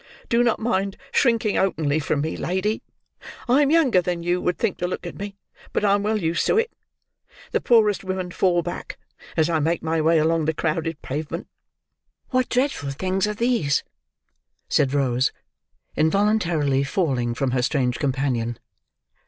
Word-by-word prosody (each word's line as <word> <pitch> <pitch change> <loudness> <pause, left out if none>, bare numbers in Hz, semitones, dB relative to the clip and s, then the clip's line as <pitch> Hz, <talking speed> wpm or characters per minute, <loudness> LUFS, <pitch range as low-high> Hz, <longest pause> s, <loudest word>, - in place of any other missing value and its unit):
Do 235 0 +3
not 235 -2 +2
mind 200 -4 -1
shrinking 230 -5 +2
openly 155 -5 +1
from 145 -1 -1
me, 160 +2 -2
lady. 190 +5 -1 0.7
I 255 +4 +4
am 285 - +3
younger 285 - +4
than 175 -1 -3
you 175 +1 0
would 180 - 0
think, 225 -5 -1
to 180 - 0
look 180 - -5
at 175 - -7
me, 200 0 -6 0.4
but - - +1
I 200 - +4
am 200 - +2
well 215 +1 0
used 170 -3 0
to - - +3
it. 460 0 +1 0.8
The - - +1
poorest 215 -5 +3
women 185 -1 -3
fall 175 -1 +2
back, - - -6 0.4
as 160 -1 +4
I 165 -2 +1
make 160 +2 0
my 160 0 0
way 165 +1 +4
along 160 0 +2
the 160 0 0
crowded 160 0 -1
pavement." 155 +5 -4 0.8
"What 255 -1 +1
dreadful 255 - 0
things 185 +7 -1
are 210 - -2
these!" 230 - +1 0.8
said 140 -3 +2
Rose, 130 -3 +1 0.6
involuntarily 160 -6 +2
falling 130 -7 0
from 135 0 0
her 125 0 +1
strange 125 -1 0
companion. 130 -5 -1
170 Hz, 165 wpm, -23 LUFS, 150-210 Hz, 0.8 s, I